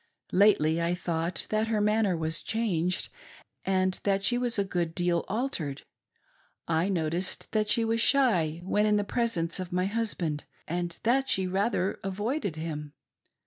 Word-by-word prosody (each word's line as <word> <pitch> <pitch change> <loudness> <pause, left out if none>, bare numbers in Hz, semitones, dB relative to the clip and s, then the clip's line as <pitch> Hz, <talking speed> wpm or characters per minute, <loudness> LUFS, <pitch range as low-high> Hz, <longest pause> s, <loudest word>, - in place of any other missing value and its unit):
Lately 170 -5 +4
I 170 +1 +1
thought 170 -1 -2
that 215 +1 +1
her 220 -1 +1
manner 210 -3 +2
was 160 0 0
changed 185 -6 -1 0.5
and 185 -1 +1
that 195 -1 +1
she 245 - +3
was 245 -2 +1
a 200 - +3
good 175 -4 -2
deal 175 -1 +1
altered. 190 - -2 0.8
I 165 +3 +1
noticed 175 0 -2
that 215 -1 +1
she 230 0 +3
was 225 0 +1
shy 180 - +3
when 205 +3 +2
in 210 - +3
the 205 - +2
presence 200 -7 -1
of 185 -1 -5
my 180 +1 +1
husband, 195 -8 -2 0.2
and 175 +1 -3
that 265 +4 +2
she 190 - +2
rather 195 +1 0
avoided 205 - -2
him. 150 -2 -5
190 Hz, 155 wpm, -28 LUFS, 170-215 Hz, 0.8 s, Lately